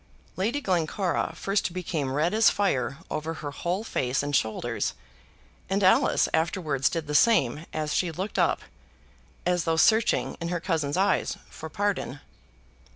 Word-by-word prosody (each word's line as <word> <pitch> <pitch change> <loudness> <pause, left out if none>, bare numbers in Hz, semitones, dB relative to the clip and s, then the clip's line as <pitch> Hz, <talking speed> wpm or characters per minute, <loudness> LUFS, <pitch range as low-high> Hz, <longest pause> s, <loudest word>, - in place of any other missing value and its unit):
Lady 220 +9 0
Glencora 180 - 0
first 195 -1 -1
became 160 -7 -2
red 155 +7 +1
as 220 +1 +6
fire 135 - 0
over 160 +2 -3
her 145 -2 -6
whole 180 +7 -2
face 130 - -1
and 145 0 -1
shoulders, 110 -4 -1 0.7
and 195 +1 +1
Alice 185 - +4
afterwards 160 -4 +1
did 165 -2 -3
the 150 - -5
same 150 - +3
as 155 -1 -2
she 175 -2 +1
looked 190 +6 -4
up, - - +2 0.8
as 180 -2 +1
though 165 0 +1
searching 220 +7 +3
in 170 - -2
her 175 0 -1
cousin's 160 -4 -1
eyes 195 +2 +1
for 160 - -8
pardon. 200 -7 -2
165 Hz, 150 wpm, -27 LUFS, 150-190 Hz, 0.8 s, as